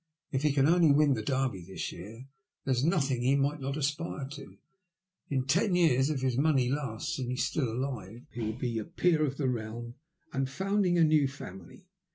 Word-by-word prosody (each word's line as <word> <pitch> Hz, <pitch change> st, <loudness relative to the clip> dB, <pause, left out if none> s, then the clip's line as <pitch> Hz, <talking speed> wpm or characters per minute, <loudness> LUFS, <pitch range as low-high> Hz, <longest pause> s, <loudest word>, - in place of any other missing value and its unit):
If 135 Hz, -, 0 dB
he 150 Hz, 0 st, +3 dB
can 135 Hz, 0 st, +3 dB
only 170 Hz, -2 st, +5 dB
win 145 Hz, 0 st, +5 dB
the 110 Hz, -, -2 dB
Derby 130 Hz, -6 st, -1 dB
this 95 Hz, +2 st, -5 dB
year, 115 Hz, +9 st, -10 dB, 0.4 s
there 135 Hz, -, +2 dB
is 125 Hz, +1 st, 0 dB
nothing 140 Hz, -7 st, +1 dB
he 130 Hz, +3 st, +3 dB
might 140 Hz, +2 st, +1 dB
not 135 Hz, +2 st, -3 dB
aspire 150 Hz, -1 st, -2 dB
to. 140 Hz, -1 st, -10 dB, 0.7 s
In 130 Hz, -2 st, 0 dB
ten 180 Hz, +7 st, +2 dB
years, 140 Hz, -6 st, +4 dB
if 145 Hz, -4 st, -1 dB
his 130 Hz, -1 st, 0 dB
money 140 Hz, -5 st, +3 dB
lasts 140 Hz, +2 st, -3 dB
and 130 Hz, -, -3 dB
he 125 Hz, -, -2 dB
is 125 Hz, +1 st, +1 dB
still 135 Hz, -7 st, -1 dB
alive, 120 Hz, -3 st, -5 dB
he 120 Hz, -, -5 dB
will 110 Hz, +1 st, -2 dB
be 120 Hz, -3 st, -2 dB
a -, -, -3 dB
peer 170 Hz, -2 st, +1 dB
of 140 Hz, -2 st, -1 dB
the 140 Hz, -, 0 dB
realm 120 Hz, 0 st, -4 dB, 0.4 s
and 135 Hz, 0 st, -1 dB
founding 190 Hz, +2 st, +1 dB
a 170 Hz, -, +5 dB
new 155 Hz, -3 st, +4 dB
family." 95 Hz, -, -10 dB
135 Hz, 210 wpm, -30 LUFS, 125-150 Hz, 0.7 s, only